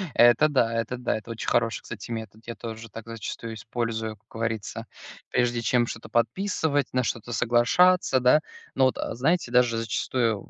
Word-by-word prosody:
Это 120 +6 +6
да 120 -5 +2
это 115 +2 -2
да, 125 -1 -1
это 110 - -11
очень 115 - -6
хороший, 115 -1 +1
кстати, - - -8
метод. 110 -2 -6
Я 115 - -5
тоже 115 -1 -8
так 115 +2 -10
зачастую 115 0 -6
использую, 110 -1 -3
как - - -41
говорится, 110 -2 -4 0.4
прежде 120 -1 +1
чем 120 +1 +2
что-то 115 - -7
подписывать, 145 +1 0
на 125 0 +2
что-то 120 +1 -3
соглашаться, 130 +8 +4
да. 125 +5 +5 0.3
Но, 130 - +4
вот, 130 - +1
знаете, 135 +4 0
даже 120 -2 +3
зачастую, 115 -1 -1
120 Hz, 165 wpm, -26 LUFS, 115-125 Hz, 0.4 s, Это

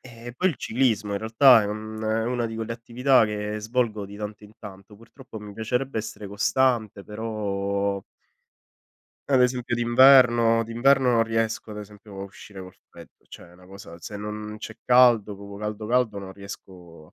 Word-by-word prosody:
Ehm, 120 -1 -11
poi 185 +1 +2
il 155 - -6
ciclismo 110 -5 0
in 100 - -1
realtà 115 +2 +5
è - - -2
un 110 +1 -6
è 110 0 -1
una 120 -1 -1
di 115 - -7
quelle 115 0 -5
attività 120 +2 +2
che 105 0 -4
svolgo 110 -2 -2
di 100 +1 -11
tanto 105 0 -7
in 105 - -16
tanto. 100 0 -12
Purtroppo, 115 +1 -13
mi 105 -1 -10
piacerebbe 125 +3 -2
essere 105 -2 -7
costante, 110 -1 0
però 100 -2 -3 1.3
ad 130 -2 +5
esempio, 125 -1 0
d'inverno 120 -2 +5
d'inverno 125 +3 +3
non 115 -1 +3
riesco, 115 -1 -2
ad 105 - -8
esempio, 105 -1 -11
a - - -4
uscire 100 0 -12
col 95 - -12 0.2
freddo. - - -17
Cioè, - - -12
è - - -19
una 90 +1 -18
cosa 95 -3 -12
se 105 +4 -8
non 105 +1 -6
c'è 110 0 -9
caldo, 120 -5 +4
proprio 100 0 -10
caldo, 105 0 -5
caldo 120 -3 +1
non 95 -1 -8
riesco 90 -5 -12
a - - -26
110 Hz, 180 wpm, -24 LUFS, 100-120 Hz, 1.3 s, realtà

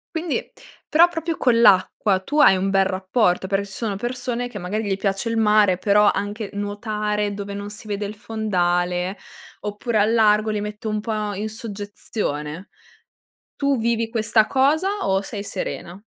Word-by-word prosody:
Quindi, 325 -1 -2 0.4
però 330 +3 +6
proprio 330 -1 -3
con 235 -3 +3
l'acqua, 195 -1 +4
tu 290 +11 -2
hai 190 - +7
un 195 +1 0
bel 195 0 +4
rapporto? 190 0 +1
Perché 195 +1 0
ci - - -13
sono 210 -3 -3
persone, 245 +2 -3
che 215 - -8
magari 205 +4 -3
gli 195 -1 -1
piace 195 +3 -1
il 230 - -1
mare, 210 -4 +4
però 205 +2 +4
anche 205 +1 -4
nuotare 210 0 -2
dove 200 0 -6
non 200 0 -5
si 215 +2 -10
vede 205 0 -3
il 210 +2 -6
fondale, 180 -4 -1 0.4
oppure 210 +2 -2
a 205 - +5
largo, 215 -1 +3
li 210 -1 -1
mette 210 +1 -6
un 215 0 -1
po' 215 -1 -3
in 210 +3 -3
soggezione. 205 - -5 0.9
Tu 280 -1 +1
vivi 230 0 0
questa 220 -1 +2
cosa 290 +7 +2 0.2
o 190 0 +2
sei 200 0 -6
serena? 195 -1 -5
210 Hz, 165 wpm, -22 LUFS, 195-225 Hz, 0.9 s, hai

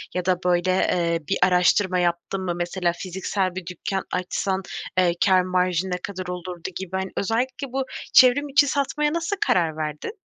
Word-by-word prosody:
Ya 180 -1 -1
da 185 -1 +2
böyle, 180 0 +2
eee, 170 -2 +1
bir 195 - +1
araştırma 180 +1 +3
yaptın 175 +2 -1
mı? 180 -2 -2
Mesela, 175 0 -1
fiziksel 185 0 -2
bir 185 -2 -5
dükkân 185 +2 -3
açsan, 190 +1 -1 0.4
eee, 180 -2 +4
kâr 190 -2 +5
marjı 180 0 0
ne 180 - -1
kadar 185 -2 -5
olurdu 180 0 -5
gibi. 190 -2 -6
Hani, 190 0 -3
özellikle 250 +6 -1
bu, 270 0 0 0.3
çevrim 270 +3 +6
içi 285 +1 +4
satmaya 295 +2 0
nasıl 335 +4 -1
karar 165 -3 +2
verdin? 150 - -4
185 Hz, 170 wpm, -23 LUFS, 180-200 Hz, 0.4 s, çevrim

